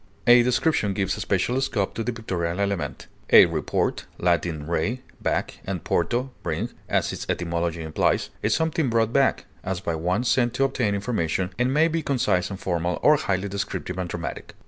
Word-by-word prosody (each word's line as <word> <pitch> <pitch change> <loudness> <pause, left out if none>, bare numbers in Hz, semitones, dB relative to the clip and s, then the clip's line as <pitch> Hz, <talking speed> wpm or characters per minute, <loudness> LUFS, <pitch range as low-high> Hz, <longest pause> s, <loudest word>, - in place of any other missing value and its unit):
A 120 0 +8
description 120 -4 +1
gives 95 -2 0
especial 110 +7 0
scope 115 -7 -1
to 115 - -3
the 125 - -1
pictorial 90 -6 -3
element. 100 -3 -2 0.2
A - - +9
report - - -1
(L. 85 -1 +3 0.3
re, 105 +11 -1 0.2
back, - - -1
and 95 -4 -4
porto, 120 +10 0
bring), - - -2 0.2
as - - +1
its - - -6
etymology 85 -1 -1
implies, 80 0 0
is - - +2
something 160 -3 0
brought 115 0 +1
back, 135 -1 +2 0.2
as 95 -1 -2
by 85 - -2
one 90 +8 0
sent 120 -1 +2
to 135 - +2
obtain 125 -6 +1
information, 95 -4 -1
and 125 +1 +2
may 155 +4 +4
be 165 0 -1
concise 120 - +1
and 95 -1 -6
formal 85 -1 -1
or 150 - +7
highly 100 -5 -1
descriptive 95 -2 -4
and 90 -2 -3
dramatic. 85 0 -6
100 Hz, 175 wpm, -24 LUFS, 90-125 Hz, 0.3 s, A